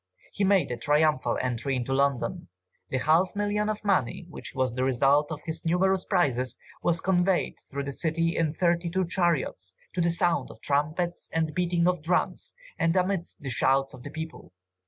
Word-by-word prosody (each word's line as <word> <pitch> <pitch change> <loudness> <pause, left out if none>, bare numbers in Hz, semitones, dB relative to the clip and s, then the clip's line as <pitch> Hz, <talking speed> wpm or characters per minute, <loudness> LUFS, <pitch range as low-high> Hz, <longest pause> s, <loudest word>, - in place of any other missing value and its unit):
He 200 - -2
made 195 -7 +3
a 120 - -2
triumphal 150 -1 +2
entry 125 +2 -1
into 125 +1 -2
London. 140 +5 0 0.4
The 130 - 0
half 160 +8 +2
million 205 +1 0
of 215 0 -4
money, 180 - +1
which - - -9
was 130 -2 0
the 130 +1 -1
result 135 +4 +3
of 155 -1 -5
his 160 -1 -3
numerous 185 +2 +2
prizes, 130 - +1 0.2
was 170 -1 +1
conveyed 180 0 +1
through 140 0 -3
the 140 - -4
city 165 +3 0
in 160 -2 +1
thirty 170 +1 +1
two 185 +2 0
chariots, 165 - -1 0.2
to 180 - 0
the 170 - +3
sound 170 0 +1
of - - -12
trumpets 155 +5 -1
and 160 -1 0
beating 175 -1 +1
of 180 -3 +1
drums 175 +4 -1 0.2
and 165 0 +2
amidst 185 -1 -1
the 135 - -3
shouts 135 +4 +2
of - - -11
the 145 - -8
people. 160 - -8
165 Hz, 180 wpm, -27 LUFS, 135-180 Hz, 0.4 s, made